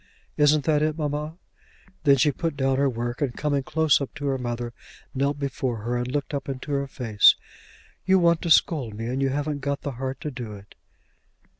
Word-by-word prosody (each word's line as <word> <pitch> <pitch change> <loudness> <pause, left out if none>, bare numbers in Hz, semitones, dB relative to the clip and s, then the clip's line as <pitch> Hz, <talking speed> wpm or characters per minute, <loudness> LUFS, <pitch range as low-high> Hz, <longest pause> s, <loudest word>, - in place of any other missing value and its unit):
Isn't 150 0 +4
that 150 -2 +3
it, 155 0 0
mamma?" 150 +1 -3 0.7
Then 140 -1 +7
she 145 +3 +3
put 165 +1 -3
down 135 -1 +1
her 140 0 +3
work, 120 +1 -4
and 135 -4 -1
coming 145 -2 0
close 155 +1 +2
up 140 - -4
to 145 -1 -5
her 135 -1 0
mother, 120 -1 -4 0.4
knelt 140 +1 0
before 130 -5 -3
her 120 +2 -1
and 125 +1 -2
looked 145 +1 -2
up 140 0 -3
into 135 +2 -5
her 140 0 0
face. 115 -6 +4 0.7
"You 190 +1 +4
want 170 -2 +3
to 170 - -3
scold 140 -8 +3
me, 115 +2 -5
and 130 +3 -2
you 135 - +2
haven't 145 +1 -2
got 140 0 -2
the 145 - -3
heart 130 0 -3
to 150 - -4
do 120 -4 -7
it." 100 0 -13
140 Hz, 205 wpm, -25 LUFS, 125-150 Hz, 0.7 s, Then